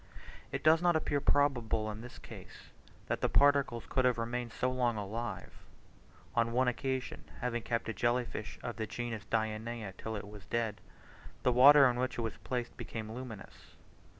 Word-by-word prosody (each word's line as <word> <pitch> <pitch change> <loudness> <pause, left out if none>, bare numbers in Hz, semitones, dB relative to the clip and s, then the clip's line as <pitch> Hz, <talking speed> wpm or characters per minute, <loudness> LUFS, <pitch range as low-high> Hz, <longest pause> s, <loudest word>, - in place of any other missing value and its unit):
It - - -3
does 160 +1 +6
not 175 -1 +3
appear 145 -2 0
probable 120 -7 +2
in 105 +1 -8
this 125 +1 -10
case, - - -12 0.3
that - - -2
the - - +2
particles 140 -5 +3
could 130 - +1
have 125 -2 +3
remained 120 +1 -3
so 130 +4 -1
long 125 -3 +1
alive. 110 +4 -4 0.8
On 115 0 +2
one 130 +1 +3
occasion 130 +1 -2 0.2
having 120 -2 -1
kept 115 0 -2
a 115 - -2
jelly 120 +4 +1
fish 110 -2 -7
of 120 - -4
the 110 -1 -3
genus 115 -3 -4
Dianaea 110 -1 -2
till 110 0 -4
it 100 -1 -6
was 105 -2 -11
dead, 115 -3 -1 0.6
the 125 - +4
water 135 +3 +8
in 120 -1 0
which 130 +1 -1
it - - -1
was 115 -3 -3
placed 125 -2 -4
became 110 -1 -6
luminous. 115 -3 -9
120 Hz, 180 wpm, -32 LUFS, 110-130 Hz, 0.8 s, water